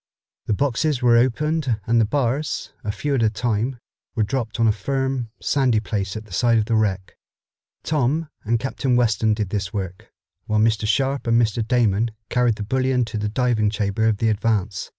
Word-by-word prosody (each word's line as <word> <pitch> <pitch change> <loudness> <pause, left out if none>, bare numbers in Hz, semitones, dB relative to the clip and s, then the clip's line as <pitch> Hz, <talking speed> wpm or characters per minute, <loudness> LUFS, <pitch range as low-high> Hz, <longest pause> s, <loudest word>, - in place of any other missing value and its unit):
The - - +2
boxes 140 +2 0
were 120 -1 +5
opened 130 +1 +1
and 115 0 +3
the - - +3
bars, 140 +4 -1
a 105 - -1
few 140 +8 -2
at 130 - +1
a 110 - +4
time, 115 +3 -1 0.4
were 110 - +2
dropped 120 0 -3
on 115 - +4
a - - +5
firm, 130 +3 -2
sandy 130 -6 +2
place 100 -2 -3
at 110 - -8
the 100 - -13
side 115 +4 +3
of 110 - +1
the 115 - -1
wreck. 100 -4 0 0.7
Tom 155 +2 0 0.2
and 115 +1 +1
Captain 130 0 -1
Weston 110 -3 +2
did 105 -3 -2
this 100 -2 -2
work, 95 -3 -5 0.4
while 110 0 +1
Mr. 110 -1 +2
Sharp 135 +4 0
and 115 0 +4
Mr. 115 -1 +1
Damon 115 -3 +2 0.2
carried 125 -2 +2
the 105 - -5
bullion 130 +2 +1
to 110 -1 -5
the 105 0 -1
diving 115 -2 +1
chamber 105 +1 0
of 110 -2 +2
the 115 +2 +1
Advance. 105 -2 -1
115 Hz, 190 wpm, -22 LUFS, 105-125 Hz, 0.7 s, were